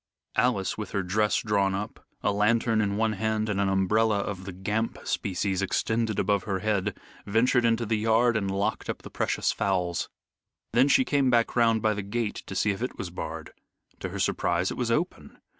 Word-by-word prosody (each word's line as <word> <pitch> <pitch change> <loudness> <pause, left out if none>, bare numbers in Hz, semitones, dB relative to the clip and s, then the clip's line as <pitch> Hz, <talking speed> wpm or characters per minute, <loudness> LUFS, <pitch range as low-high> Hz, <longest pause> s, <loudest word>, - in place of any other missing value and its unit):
Alice, 110 -5 +1
with 105 - -6
her 100 - 0
dress 105 +2 +1
drawn 100 -3 +1
up, 105 +2 -6 0.2
a - - +2
lantern 110 +2 +2
in 100 -1 0
one 110 0 +1
hand 110 +1 -1
and 100 -2 0
an 100 - +2
umbrella 105 +3 +2
of 100 -2 -4
the 95 - -5
Gamp 105 +5 -2
species 95 0 -1
extended 110 +2 0
above 100 -3 +1
her 100 -2 -1
head, 105 0 -1 0.3
ventured 120 +4 +3
into 115 0 +2
the 110 0 0
yard, 115 +2 +3
and 100 -3 0
locked 100 +3 -1
up - - -4
the - - -10
precious - - 0
fowls. 90 -3 -1 0.6
Then 125 +3 +5
she 260 - +4
came 140 - +2
back 120 -2 +2
round 115 -2 +3
by 110 -1 +3
the 105 - -3
gate 105 +2 -3
to 95 - -6
see 105 +2 +2
if 100 - -5
it 125 - -3
was 90 - -5
barred. 80 -2 -6 0.5
To - - -4
her - - -6
surprise 85 +2 0
it - - -4
was 120 -2 -1
open. 155 +10 -2
105 Hz, 200 wpm, -27 LUFS, 95-115 Hz, 0.6 s, Then